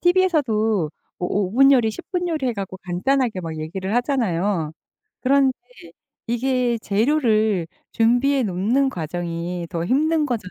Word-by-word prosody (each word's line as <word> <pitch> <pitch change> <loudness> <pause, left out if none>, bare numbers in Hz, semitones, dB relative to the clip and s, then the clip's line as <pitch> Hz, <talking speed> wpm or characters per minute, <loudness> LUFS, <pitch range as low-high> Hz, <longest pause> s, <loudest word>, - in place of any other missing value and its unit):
TV에서도 245 - +2 0.3
뭐 180 - -2
5 195 -2 0
분 275 +3 +6
요리, 235 -5 +3
10 - - -10
분 355 -1 -1
요리 305 -5 -1
해 245 - +1
갖고 195 -2 -6
간단하게 215 +4 0
막 165 -2 -6
얘기를 190 +6 -4
하잖아요. 200 - 0 0.5
그런데 270 0 +3 0.7
이게 245 0 0
재료를 220 - +1 0.3
준비해 245 +4 +3
놓는 225 +7 +1
과정이 170 0 -4
더 170 -1 -2
힘든 305 - +2
거잖아요. 225 -8 -3
225 Hz, 285 characters per minute, -22 LUFS, 185-270 Hz, 0.7 s, 분